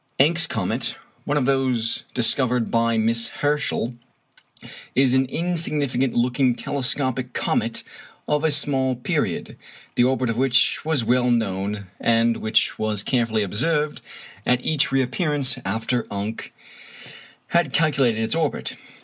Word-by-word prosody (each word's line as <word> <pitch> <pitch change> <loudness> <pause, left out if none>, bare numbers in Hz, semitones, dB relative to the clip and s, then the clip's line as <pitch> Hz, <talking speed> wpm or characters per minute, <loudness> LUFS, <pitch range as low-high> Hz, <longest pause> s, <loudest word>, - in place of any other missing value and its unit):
Encke's 165 +4 +4
comet 95 -5 -2 0.3
(one 145 - 0
of 140 - +1
those 130 -4 +1
discovered 125 0 +2
by 115 0 +2
Miss 115 +1 +1
Herschel) 145 -4 -1 1.0
is 130 0 +3
an 130 0 +3
insignificant 145 -5 0
looking 125 +1 +2
telescopic 130 -2 -2
comet 115 +1 -1 0.4
of 150 +1 +1
small 135 -3 +2
period, 125 - -2 0.4
the 120 - +3
orbit 130 -1 +1
of 115 - -4
which 130 -1 +2
was 150 -7 0
well 125 +1 +2
known, 100 -3 -1
and 115 0 +2
which 110 0 +1
was 105 -2 -1
carefully 115 -4 +1
observed 150 - -1 0.4
at 125 +2 +1
each 150 -2 +2
reappearance 135 +1 0
after 115 +5 -1
Encke 105 +2 -5 1.0
had 170 -5 +2
calculated 135 -8 +2
its 110 - -1
orbit. 160 -2 -2
125 Hz, 125 wpm, -23 LUFS, 115-140 Hz, 1.0 s, Encke's